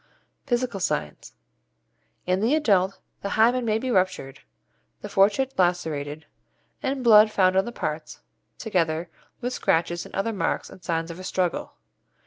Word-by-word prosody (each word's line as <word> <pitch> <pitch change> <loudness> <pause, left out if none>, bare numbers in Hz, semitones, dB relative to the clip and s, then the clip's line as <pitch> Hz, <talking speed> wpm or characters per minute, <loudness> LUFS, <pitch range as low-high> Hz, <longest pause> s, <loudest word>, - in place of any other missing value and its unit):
Physical 240 -4 -1
Signs. 75 - -3 0.9
In 185 +1 +1
the 230 +8 +2
adult 195 -10 +2 0.2
the 200 - -3
hymen 240 +3 +4
may 215 -1 +1
be 255 +3 -3
ruptured, 185 - 0 0.6
the - - -6
fourchette 215 +7 +2
lacerated, 160 -4 -1 0.6
and 265 -1 -2
blood 215 -2 +7
found 185 -3 +2
on 190 +1 +3
the 240 - -5
parts, 155 -8 -5 0.4
together 170 -6 -1 0.3
with 250 +1 -2
scratches 170 -5 0
and - - -11
other 225 +3 -1
marks 200 - -2
and 185 - -14
signs 165 -1 -2
of 170 - -9
a - - -8
struggle. 185 -2 -2
190 Hz, 145 wpm, -25 LUFS, 170-230 Hz, 0.9 s, blood